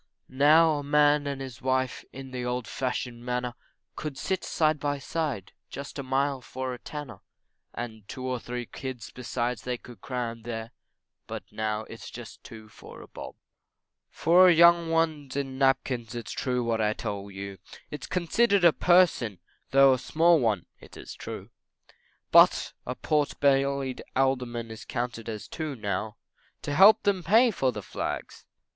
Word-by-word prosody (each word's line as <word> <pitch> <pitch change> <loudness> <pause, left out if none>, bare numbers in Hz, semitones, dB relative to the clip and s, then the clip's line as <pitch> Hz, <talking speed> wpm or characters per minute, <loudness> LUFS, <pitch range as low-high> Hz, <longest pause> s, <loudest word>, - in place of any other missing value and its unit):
Now 150 +3 +5
a - - -5
man 145 0 +3
and 140 -1 -3
his 130 -3 -8
wife 130 -1 0
in 135 -1 -9
the 125 -1 -4
old 125 -1 -2
fashioned 125 -2 -3
manner, 125 0 -2 0.4
Could 150 -3 -5
ride 190 - 0
side 155 -2 +1
by 145 0 -1
side 135 - -3 0.2
just 140 +1 -7
a - - -1
mile 135 0 0
for 130 0 -5
a 125 - -8
tanner 145 -9 -8 0.6
And 110 -4 -7
two 130 -1 -6
or 130 -1 -2
three 120 +1 -5
kids 130 -2 -7
besides 120 -1 -3
they 125 -1 -3
could 120 0 -14
cram 120 -3 -4
there, 115 0 -6 0.6
But - - -6
now 110 0 -2
it's 115 +1 -10
just 120 -2 -10
two 110 -1 -11
for 110 - -13
a - - -14
bob; - - -9 0.7
For 180 +3 +5
a 180 - +7
young 170 0 +6
one 160 -3 0
in 135 -2 -3
napkins, 130 -3 +1
it's 120 -2 -5
true 125 -2 -1
what 115 -1 0
I 105 0 +2
tell 100 -3 -5
you, 100 -1 -7 0.3
Is 150 - -6
considered 195 +2 +2
a 170 - +7
person, 175 - +3 0.3
though 135 0 +6
a 130 - -1
small 165 +4 +4
one, 110 -8 0
it - - -14
is - - -9
true, - - -8 0.8
Butt, - - +6
a 125 - -3
pot 150 0 0
bellied 140 -1 +1
Alderman 125 -3 0
is 110 - -9
counted 115 -2 -4
as 105 -2 -6
two, 155 -3 -4
now, 105 0 -3 0.5
To 145 - -3
help 195 +8 +7
them 200 -2 +1
to 170 - -12
pay 230 +3 +6
for 135 -9 0
the - - -7
Flags! - - -5
130 Hz, 170 wpm, -27 LUFS, 120-150 Hz, 0.8 s, a